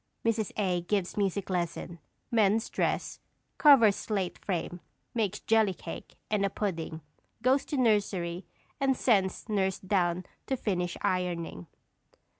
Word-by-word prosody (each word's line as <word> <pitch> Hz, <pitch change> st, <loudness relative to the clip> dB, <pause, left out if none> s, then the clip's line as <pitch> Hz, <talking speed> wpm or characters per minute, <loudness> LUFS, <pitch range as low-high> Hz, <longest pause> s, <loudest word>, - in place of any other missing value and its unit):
[_Mrs. 225 Hz, -2 st, +1 dB
A. 185 Hz, -4 st, +1 dB
gives 190 Hz, +1 st, -1 dB
music 200 Hz, -1 st, 0 dB
lesson; 170 Hz, -1 st, -3 dB, 0.3 s
mends 220 Hz, -1 st, +3 dB
dress; -, -, -1 dB, 0.4 s
covers 245 Hz, -9 st, +7 dB
slate 195 Hz, -4 st, -2 dB
frame; 175 Hz, -1 st, -3 dB, 0.3 s
makes 210 Hz, -3 st, -1 dB
jelly 220 Hz, -4 st, +3 dB
cake -, -, -8 dB, 0.2 s
and 210 Hz, -2 st, +2 dB
a 200 Hz, -, +2 dB
pudding; 165 Hz, -6 st, -3 dB, 0.4 s
goes 265 Hz, +3 st, +3 dB
to 290 Hz, -, -3 dB
nursery 200 Hz, -7 st, +1 dB, 0.3 s
and 270 Hz, -2 st, +2 dB
sends 195 Hz, -6 st, +2 dB
nurse 190 Hz, -3 st, +1 dB
down 185 Hz, -2 st, 0 dB, 0.2 s
to 265 Hz, -, 0 dB
finish 180 Hz, -6 st, -1 dB
ironing. 170 Hz, -, -1 dB
195 Hz, 125 wpm, -29 LUFS, 180-220 Hz, 0.4 s, covers